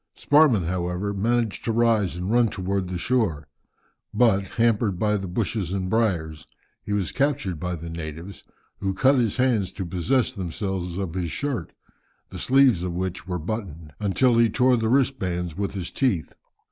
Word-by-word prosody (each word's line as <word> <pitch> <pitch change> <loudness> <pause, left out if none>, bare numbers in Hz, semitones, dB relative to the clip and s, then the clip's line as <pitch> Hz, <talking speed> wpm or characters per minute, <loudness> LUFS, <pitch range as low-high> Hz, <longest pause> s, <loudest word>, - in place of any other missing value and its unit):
Sparrman, 145 - +4
however, 90 +3 -2
managed 115 +2 0
to 115 - +1
rise 115 -5 +2
and 90 +3 -3
run 120 0 +4
towards 95 -2 -2
the 90 - -2
shore, 95 -8 0 0.6
but, 110 -5 +3
hampered 115 -4 +2
by 105 +2 +1
the 95 -2 -3
bushes 95 -1 -2
and 95 -1 -2
briars, 85 -9 0 0.3
he - - -7
was 100 -3 0
captured 135 - -1
by 90 +2 -3
the 85 0 -8
natives, 80 +3 -7 0.4
who 95 -1 -2
cut 135 +5 +4
his 115 -2 0
hands 120 -8 +1
to 95 - -4
possess 95 +9 0
themselves 95 -2 -4
of 95 -4 -3
his 90 -2 -2
shirt, 130 - -3 0.6
the - - -7
sleeves 130 -8 +4
of 90 -1 -3
which 95 +1 -4
were 90 -1 -2
buttoned, 85 -4 -6
until 115 +4 +2
he 115 -1 +5
tore 125 +3 +3
the 115 -2 0
wristbands 95 - 0
with 100 +1 -3
his 90 -3 -5
teeth. 115 - 0
100 Hz, 170 wpm, -24 LUFS, 90-115 Hz, 0.6 s, he